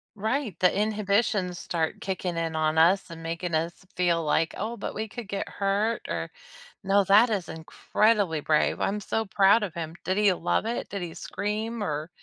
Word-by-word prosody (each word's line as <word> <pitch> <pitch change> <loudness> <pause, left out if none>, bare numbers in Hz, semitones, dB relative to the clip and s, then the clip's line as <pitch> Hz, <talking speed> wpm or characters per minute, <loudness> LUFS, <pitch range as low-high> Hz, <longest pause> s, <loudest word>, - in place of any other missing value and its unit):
Right, 220 - -2
the 180 - +5
inhibitions 205 -3 0
start 160 -2 -2
kicking 185 -3 -3
in 165 -1 -2
on 155 0 +1
us, 180 +4 +4
and 165 -1 -9
making 165 +1 -4
us 170 +4 -2
feel 170 -2 +2
like, 160 +2 +1
"Oh, 225 +3 -3
but - - -5
we 220 0 -3
could 240 -3 -7
get 200 0 -4
hurt, 205 +3 -1
or" - - -3 0.5
No, 195 +1 +3
that 215 +5 +6
is 190 -6 -1
incredibly 165 +2 +1
brave. 155 0 +1
I'm 205 +2 0
so 225 +2 -2
proud 200 +3 +4
of 190 -6 -3
him. 165 -1 -5
Did 185 +1 -1
he 205 -2 +5
love 175 +5 0
it? 235 - -3
Did 200 -3 -5
he 165 -2 -6
scream, 215 +2 -3
or 155 0 -3
195 Hz, 185 wpm, -27 LUFS, 165-210 Hz, 0.5 s, that